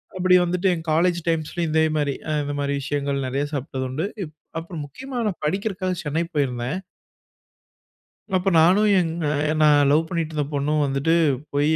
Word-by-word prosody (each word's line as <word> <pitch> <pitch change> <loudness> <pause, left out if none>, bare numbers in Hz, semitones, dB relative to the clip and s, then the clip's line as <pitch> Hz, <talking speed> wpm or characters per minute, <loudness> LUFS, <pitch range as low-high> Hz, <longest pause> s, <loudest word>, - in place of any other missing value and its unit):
அப்படி 185 0 +4
வந்துட்டு 180 +2 0
என் 165 0 -7
காலேஜ் 175 +2 +2
டைம்ஸ்‌லும் 165 +1 -1
இதே 160 0 +3
மாதிரி 145 -2 0 0.2
அ - - 0
இந்த 145 0 -3
மாதிரி 140 0 -1
விஷயங்கள் 140 -1 -2
நிறைய 135 +3 -1
சாப்டதுண்டு. 130 +3 -3 0.2
இப் 155 -2 -9 0.3
அப்புறம் 165 -2 -7
முக்கியமா 255 - -7
நான் 190 - -4
படிக்கிறக்காக 185 +1 -1
சென்னை 155 +3 -1
போயிருந்தேன். 130 +1 -1 1.6
அப்ப 185 +1 +2
நானும் 195 +6 +5
எங்க 165 -1 -2 0.4
நான் 145 -2 +5
லவ் 160 +2 +3
பண்ணீட்டு 165 -3 -3
இருந்த 150 -2 -1
பொண்ணும் 150 +2 +1
வந்துட்டு, 140 +4 +1 0.4
போயி 145 +2 +2
155 Hz, 155 wpm, -23 LUFS, 145-175 Hz, 1.6 s, நானும்